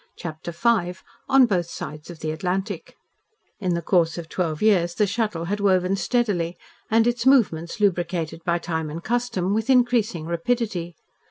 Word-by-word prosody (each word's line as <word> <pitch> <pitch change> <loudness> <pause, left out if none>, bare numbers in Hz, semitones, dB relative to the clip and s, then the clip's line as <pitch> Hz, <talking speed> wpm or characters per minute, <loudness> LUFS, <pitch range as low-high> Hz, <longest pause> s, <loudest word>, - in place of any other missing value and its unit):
CHAPTER 160 0 -6
V 180 -1 +1 0.3
ON 265 -1 +7
BOTH 180 -7 0
SIDES 150 -1 -7
OF 170 -2 -10
THE 155 - -2
ATLANTIC 185 +3 -3 0.6
In 180 -4 0
the 170 - -3
course 165 -2 +2
of 165 -2 -7
twelve 160 -4 -2
years 180 -5 +3
the 210 - +3
Shuttle 205 -5 -2
had 205 +4 -2
woven 190 -1 +2
steadily 195 -6 0 0.3
and 225 +1 +4
its 240 +1 0
movements 200 -9 +3
lubricated 170 -4 0
by 170 0 +1
time 160 -2 -3
and 165 +3 -6
custom 235 -6 -1
with 220 +3 -1
increasing 240 -9 +2
rapidity. 175 0 -2
180 Hz, 160 wpm, -24 LUFS, 170-220 Hz, 0.6 s, ON